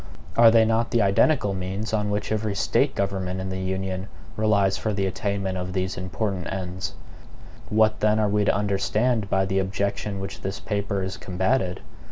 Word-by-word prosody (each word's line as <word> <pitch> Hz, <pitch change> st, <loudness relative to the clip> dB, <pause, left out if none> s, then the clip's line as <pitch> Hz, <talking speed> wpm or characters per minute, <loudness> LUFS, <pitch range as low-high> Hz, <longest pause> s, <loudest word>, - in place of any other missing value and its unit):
Are 115 Hz, -1 st, +8 dB
they 115 Hz, 0 st, +5 dB
not 115 Hz, +1 st, +1 dB
the 115 Hz, -3 st, +2 dB
identical 100 Hz, +2 st, +3 dB
means 95 Hz, +4 st, -4 dB
on 105 Hz, -1 st, +1 dB
which 105 Hz, +1 st, -2 dB
every 110 Hz, -1 st, -1 dB
State -, -, +1 dB
government 95 Hz, -2 st, -2 dB
in 95 Hz, 0 st, -4 dB
the 95 Hz, 0 st, -3 dB
Union 95 Hz, 0 st, -3 dB, 0.3 s
relies 100 Hz, -3 st, +2 dB
for 110 Hz, -, -2 dB
the 100 Hz, -1 st, 0 dB
attainment 95 Hz, -1 st, -2 dB
of 90 Hz, 0 st, -4 dB
these 95 Hz, 0 st, -1 dB
important 95 Hz, -1 st, -3 dB
ends? 95 Hz, 0 st, -4 dB, 0.7 s
What 110 Hz, 0 st, +3 dB
then 105 Hz, 0 st, +3 dB
are 110 Hz, -1 st, +2 dB
we 105 Hz, 0 st, +2 dB
to -, -, +3 dB
understand 105 Hz, +2 st, +1 dB
by 95 Hz, 0 st, +2 dB
the 95 Hz, 0 st, 0 dB
objection 100 Hz, +1 st, -2 dB
which 95 Hz, 0 st, -6 dB
this 95 Hz, 0 st, -4 dB
paper 100 Hz, -2 st, -2 dB
has 95 Hz, +1 st, -4 dB
combated? 95 Hz, +1 st, 0 dB
100 Hz, 180 wpm, -25 LUFS, 95-105 Hz, 0.7 s, Are